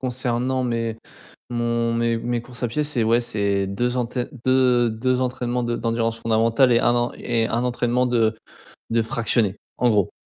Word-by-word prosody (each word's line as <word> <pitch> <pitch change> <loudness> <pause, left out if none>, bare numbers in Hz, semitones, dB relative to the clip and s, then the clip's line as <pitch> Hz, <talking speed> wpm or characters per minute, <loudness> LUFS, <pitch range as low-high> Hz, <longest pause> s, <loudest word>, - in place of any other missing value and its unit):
concernant 130 0 -1
mes 115 -2 -2 0.5
mon 120 -1 0
mes 115 0 +1
mes 120 +1 -2
courses 125 -1 -11
à 120 - +1
pied, 135 +7 -1
c'est 145 -6 -1
ouais, 115 +2 +3
c'est 100 -4 0
2 120 +6 -1
entè 125 0 -2 0.2
deux 125 -2 +3
deux 125 +3 0
entraînements 125 -1 -1
de 120 0 -1
d'endurance 115 0 -1
fondamentale 115 +3 +3
et 115 - +5
1 120 - +3
en 120 0 0
et 115 -2 -1
1 120 +2 -1
entraînement 125 0 +1
de 115 -3 +2 0.6
de 115 0 +2
fractionné 110 -2 +1 0.2
en 125 - +3
gros. 105 -5 +2
120 Hz, 175 wpm, -22 LUFS, 115-125 Hz, 0.6 s, et